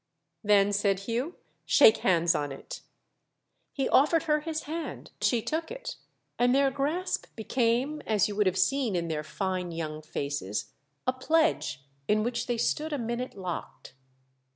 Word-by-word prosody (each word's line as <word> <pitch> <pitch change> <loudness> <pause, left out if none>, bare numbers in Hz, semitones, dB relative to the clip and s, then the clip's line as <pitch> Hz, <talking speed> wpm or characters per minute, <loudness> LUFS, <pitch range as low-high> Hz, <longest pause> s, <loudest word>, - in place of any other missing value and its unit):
"Then," 205 -1 +4
said 200 -1 +1
Hugh, 240 - -2 0.3
"shake 455 -3 +6
hands 170 -2 +3
on 145 -3 -2
it" 135 - -8 0.9
He 270 -2 -1
offered 305 +4 +4
her 300 -1 +2
his 315 +1 -4
hand, 320 +2 -6
she 235 -3 +2
took 320 +1 -2
it, - - -6 0.4
and 245 +1 +4
their 275 -1 +4
grasp 300 +7 -1
became, 245 +6 0
as 215 -3 +3
you 205 - -5
would 210 -1 +3
have 185 0 +1
seen 265 -6 +1
in 170 -1 -1
their 155 -1 -2
fine 185 +1 -3
young 155 -2 -4
faces, 140 -9 -4 0.3
a 255 - +2
pledge 310 - +1 0.2
in 215 0 +3
which 235 0 -2
they 240 -1 0
stood 305 +7 0
a - - 0
minute 235 +1 -3
locked. 180 -7 -6
230 Hz, 155 wpm, -28 LUFS, 185-285 Hz, 0.9 s, shake